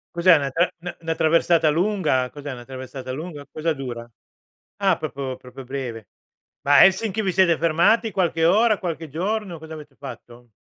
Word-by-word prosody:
Cos'è 170 0 +6
una 140 -3 -1
tra 170 +6 +3
n - - -11
'na 180 - -5
'na 165 0 -2
traversata 165 0 +3
lunga? 170 -8 +1
Cos'è 145 +1 -8
una 120 -2 -9
traversata 130 0 -8
lunga? 145 0 -7
Cosa 160 +1 -1
dura? 120 -4 -6 0.7
Ah, 195 -4 +2
proprio- 140 -4 -5
proprio 130 +1 -11
breve. 125 -4 -6 0.5
Ma 145 0 +4
a - - +10
Helsinki 195 +2 +1
vi 190 -3 -1
siete 175 -2 +4
fermati 175 +8 +3
qualche 170 -4 +1
ora, 215 +5 +4
qualche 165 -3 -5
giorno, 185 +3 -3
cosa 160 0 -10
avete 150 -3 -11
fatto? 120 0 -11
160 Hz, 175 wpm, -23 LUFS, 135-180 Hz, 0.7 s, a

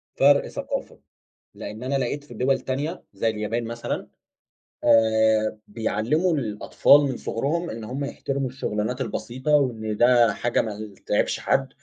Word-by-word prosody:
فرق 140 +1 +5
ثقافة. - - -5 0.6
لإن 110 +3 -7
أنا 135 +2 -1
لقيت 135 +2 -1
في 145 - -13
دول 130 +4 +1
تانية 145 +7 -3
زي 100 +3 0
اليابان 110 +2 -2
مثلًا، 115 +1 -4 0.8
آآ 110 -1 +4
بيعلّموا 115 - 0
الأطفال 125 +2 +4
من 135 -3 -1
صغرهم 155 +12 -2
إن 110 0 -6
هم 130 +6 -4
يحترموا 140 -1 -3
الشُغلانات 125 -1 -3
البسيطة 130 +2 -3
وإن 110 -6 -1
ده 120 0 +5
حاجة 120 0 0
ما 110 - -4
ي 105 0 -8
تعيبش - - +1
حد. 135 0 +1
120 Hz, 140 wpm, -24 LUFS, 110-135 Hz, 0.8 s, فرق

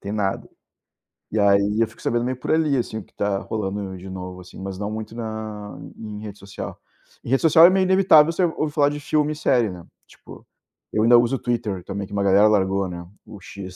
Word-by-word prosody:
tem 100 - -6
nada. 100 -2 -2 0.8
E 110 - 0
aí 100 +1 +3
eu 115 - +3
fico 110 - -18
sabendo 120 0 0
meio 130 +1 -2
por 125 - -4
ali, 155 -3 +2
assim, 120 -3 -2
o 110 - -6
que - - -27
tá 100 -1 -1
rolando 100 -2 -4
de 95 +1 -10
novo, 90 0 -7
assim, 90 +1 -13
mas 95 -1 -6
não 105 +1 -4
muito 110 +1 -6
na 110 -2 -6 0.2
em 105 -2 -7
rede 105 -1 -8
social. 100 -1 -8 0.5
Em - - -8
rede 135 +1 +2
social 160 +1 +7
é - - +8
meio 190 0 +2
inevitável 185 -5 +5
você 185 - 0
ouvir 155 -3 -1
falar 145 -2 +3
de 145 0 -5
filme 150 +1 0
e - - -4
série, 120 -7 +2
né, 90 -2 -9 0.2
tipo, - - -15 0.5
eu 110 - +1
ainda 120 +1 +7
uso 120 +3 +1
Twitter 110 -7 -3
também, 100 +1 -5
que 105 - -13
uma 100 -1 0
galera 100 +2 +5
largou, 95 -2 +1
né, 85 0 -7 0.2
o 105 - -11
X, 95 -1 -10
105 Hz, 225 wpm, -22 LUFS, 100-130 Hz, 0.8 s, é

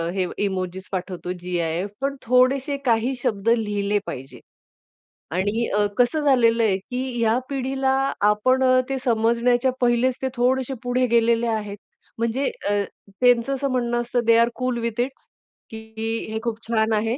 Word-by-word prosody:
हे 190 -1 +1 0.2
इमोजिस 185 -1 -4
पाठवतो, 180 -1 -4
जी-आय-एफ 175 +1 -2
पण 275 0 -1
थोडेशे 255 +4 +2
काही 235 +2 +2
शब्द 225 -4 0
लिहिले 205 -3 +1
पाहिजे. 135 +1 -8 0.9
आणि 205 +6 0
अ, 210 - +3
कसं 250 +5 +2
झालेलं 235 -4 +4
आहे, 200 -4 +2
की 250 +4 -5
या 225 +1 +3
पिढीला 265 0 -1 0.4
आपण 255 +5 +2 0.3
ते 270 - -1
समजण्याच्या 240 +2 +2
पहिलेच 245 +1 +2
ते 265 - 0
थोडेसे 260 +2 +1
पुढे 250 +1 +1
गेलेले 235 0 +3
आहेत. 210 -3 -3 0.4
म्हणजे 235 +4 -1 0.2
अ, - - +1 0.5
त्यांचं 245 +1 +4
असं 275 +1 -1
म्हणणं 240 -1 0
असतं, 240 0 -1
they 230 0 +5
are 235 0 +4
cool 255 -1 -1
with 235 -1 -3
it, 255 +3 -1 0.6
की 220 0 -5
हे 220 - -2
खूप 230 -2 -2
छान 220 -1 +1
आहे. 225 +3 0
235 Hz, 150 wpm, -23 LUFS, 215-255 Hz, 0.9 s, they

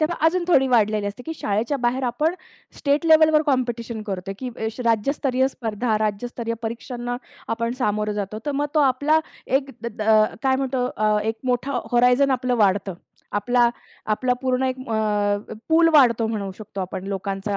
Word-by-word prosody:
तेव्हा 320 +2 0
अजून 355 +1 +1
थोडी 270 -6 +5
वाढलेली 215 -4 +2
असते 205 +5 -6
की, 320 - -3
शाळेच्या 220 +7 0
बाहेर 255 +2 +1
आपण 300 +8 0 0.4
स्टेट 290 +3 +1
लेव्हलवर 315 -1 +6
कॉम्पिटिशन 235 -3 -2
करतोय, 195 0 -4
की 260 - -5
ये 225 -2 -4 0.2
राज्यस्तरीय 255 +3 +1
स्पर्धा, 225 -2 -2
राज्यस्तरीय 230 +2 -2
परीक्षांना 240 +2 -4 0.4
आपण 230 +1 -2
सामोरं 210 -2 0
जातो, 200 +2 -5
तर 290 - 0
मग - - 0
तो 305 - +4
आपला 285 +5 +2 0.4
एक 275 -1 -9
अ, 215 -1 +3 0.2
काय 265 -1 +3
म्हणतो 260 -2 -1
अ, 215 0 +2
एक 225 - -8
मोठा 250 +1 0
होरायझन 250 +3 +4
आपलं 250 -1 0
वाढतं. 195 -1 0 0.4
आपला 240 +3 +3 0.4
आपला 250 +4 +1
पूर्ण 255 0 +1
एक 260 0 -1
अ, 210 -1 0
पूल 330 +1 +5
वाढतो 235 -6 +5
म्हणू 210 -3 -3
शकतो 210 -2 -7
आपण 185 0 -5
लोकांचा, 195 +1 -3
240 Hz, 160 wpm, -23 LUFS, 215-265 Hz, 0.4 s, लेव्हलवर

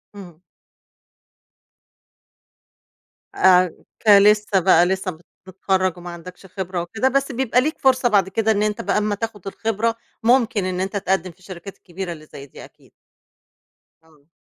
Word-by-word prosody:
إمم. 175 -5 -12 2.9
آآ، 180 -2 +4 0.3
كلسّه 210 -1 +5
بقى، 175 -1 +4
لسّه 190 0 -2
مت 160 +1 -16 0.3
متخرّج 185 -1 -1
وما 175 0 -9
عندكش 180 +2 -11
خبرة 185 -1 -5
وكده، 220 +9 -1
بس 275 +1 0
بيبقى 255 0 +1
ليك 310 +3 -3
فرصة 260 -2 +3
بعد 195 -3 +2
كده 220 +2 0
إن 210 -1 +1
أنت 210 -1 -2
بقى - - -1
أمّا 210 0 0
تاخد 205 -2 -6
الخبرة، 225 +2 -2 0.3
ممكن 235 -4 +2
إن 185 -1 -3
أنت 195 +2 -3
تقدّم 190 -2 -1
في 170 - -27
الشركات 185 +1 -11
الكبيرة 180 0 -7
اللي 155 -2 -13
زي 140 -2 -11
دي 135 - -13
أكيد. - - -22 1.1
إمم. 155 -3 -26
190 Hz, 145 wpm, -21 LUFS, 180-220 Hz, 2.9 s, كلسّه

